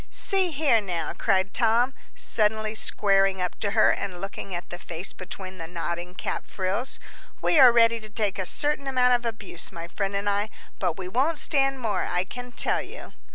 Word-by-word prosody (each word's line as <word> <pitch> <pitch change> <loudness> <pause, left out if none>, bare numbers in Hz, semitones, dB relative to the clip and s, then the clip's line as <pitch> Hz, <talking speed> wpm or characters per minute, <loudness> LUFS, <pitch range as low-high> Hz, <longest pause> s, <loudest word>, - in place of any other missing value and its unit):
"See 385 -3 0
here, 280 -7 +3
now," 170 -6 -3
cried 190 +1 +1
Tom, 240 +2 +3 0.2
suddenly 215 0 +1
squaring 195 -3 +2
up 180 -1 -3
to 205 - 0
her 215 - +6
and 185 -3 -3
looking 195 0 -6
at 175 - -6
the 175 - -6
face 175 +1 -4
between 185 0 -8
the 165 - -5
nodding 175 +1 -4
cap - - -4
frills, 195 +7 -2 0.4
"we 325 - +3
are 255 -3 +10
ready 230 0 +4
to 215 -1 -9
take 210 -2 -1
a 185 - 0
certain 295 -1 0
amount 250 -2 +3
of 240 -1 +1
abuse, 215 -7 -5
my 170 -2 -7
friend 195 +3 -3
and 200 +1 -1
I, 205 +1 +1 0.3
but 175 -4 -1
we 185 -2 -5
won't 270 - +1
stand 270 -3 +2
more, 220 -4 0
I 180 0 0
can 245 +5 -8
tell - - +1
you." - - -10
205 Hz, 195 wpm, -26 LUFS, 185-245 Hz, 0.4 s, are